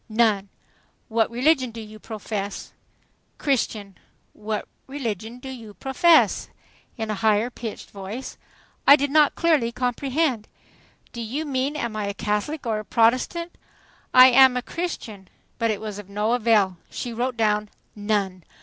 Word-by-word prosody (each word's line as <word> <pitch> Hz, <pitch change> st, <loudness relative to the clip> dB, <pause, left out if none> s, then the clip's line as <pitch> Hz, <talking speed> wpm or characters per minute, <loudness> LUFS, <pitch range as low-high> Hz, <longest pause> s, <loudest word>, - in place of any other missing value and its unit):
"None." 215 Hz, -3 st, +2 dB, 0.6 s
"What 225 Hz, -1 st, +2 dB
religion 260 Hz, +2 st, +2 dB
do 230 Hz, 0 st, -9 dB
you 215 Hz, 0 st, -10 dB
profess?" 210 Hz, -2 st, -5 dB, 0.6 s
"Christian." 215 Hz, -, -1 dB, 0.3 s
"What 215 Hz, 0 st, -4 dB, 0.2 s
religion 235 Hz, -4 st, -4 dB
do 265 Hz, +2 st, -9 dB
you 225 Hz, -5 st, -9 dB
profess?" 320 Hz, +5 st, +3 dB, 0.5 s
in 220 Hz, -2 st, -3 dB
a 210 Hz, -, -4 dB
higher 220 Hz, +2 st, +2 dB
pitched 230 Hz, -3 st, -7 dB
voice. 205 Hz, +6 st, -7 dB, 0.5 s
I 280 Hz, -, +11 dB
did 285 Hz, -1 st, -1 dB
not 300 Hz, -1 st, +4 dB
clearly 305 Hz, -9 st, +2 dB
comprehend. 250 Hz, 0 st, -1 dB, 0.7 s
"Do 235 Hz, -, -5 dB
you 265 Hz, +8 st, -3 dB
mean 275 Hz, +1 st, -1 dB
'Am 235 Hz, -7 st, -3 dB
I 210 Hz, -1 st, -2 dB
a 200 Hz, -, -4 dB
Catholic 210 Hz, +10 st, -2 dB
or 220 Hz, -2 st, 0 dB
a -, -, -6 dB
Protestant?' 255 Hz, -, +1 dB, 0.6 s
I 255 Hz, 0 st, +9 dB
am 260 Hz, 0 st, +6 dB
a 250 Hz, -, -2 dB
Christian." 230 Hz, -, -5 dB, 0.3 s
But 230 Hz, -1 st, +1 dB
it 210 Hz, -2 st, -1 dB
was 210 Hz, -2 st, -6 dB
of 200 Hz, -2 st, -11 dB
no 210 Hz, +2 st, -1 dB
avail. 215 Hz, -6 st, +2 dB
She 240 Hz, -, -5 dB
wrote 245 Hz, +1 st, -2 dB
down, 210 Hz, -1 st, +1 dB, 0.3 s
"None." 205 Hz, -4 st, -1 dB
230 Hz, 150 wpm, -24 LUFS, 210-260 Hz, 0.7 s, I